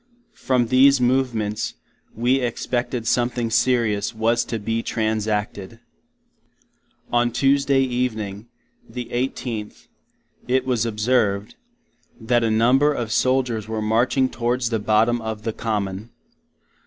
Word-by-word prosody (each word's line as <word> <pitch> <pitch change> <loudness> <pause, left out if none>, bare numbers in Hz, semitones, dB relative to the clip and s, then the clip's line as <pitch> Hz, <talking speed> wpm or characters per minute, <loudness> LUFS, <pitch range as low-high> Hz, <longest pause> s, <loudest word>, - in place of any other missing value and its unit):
From 125 -2 0
these 135 +2 +5
movements, 120 -4 0 0.4
we 125 +4 +2
expected 120 -1 -2
something 120 -1 0
serious 115 -3 +1
was 115 +2 +1
[to] 115 - -3
be 115 +2 -2
transacted. 110 -1 -2 1.3
On 120 0 +3
Tuesday 135 +2 +2
evening, 115 -5 -2 0.4
the 120 0 -6
18th, 120 -3 -4 0.6
it 130 +1 +1
was 120 -3 0
observed, 105 -2 0 0.7
that 120 +1 +1
a 115 - +1
number 125 +7 +3
of 120 -6 -3
Soldiers 125 -3 +1
were 110 0 -3
marching 120 +5 +2
towards 120 0 -1
the 110 - 0
bottom 110 +3 +2
of 110 -1 -5
the 115 - -2
Common. 105 -1 -3
115 Hz, 115 wpm, -22 LUFS, 110-125 Hz, 1.3 s, these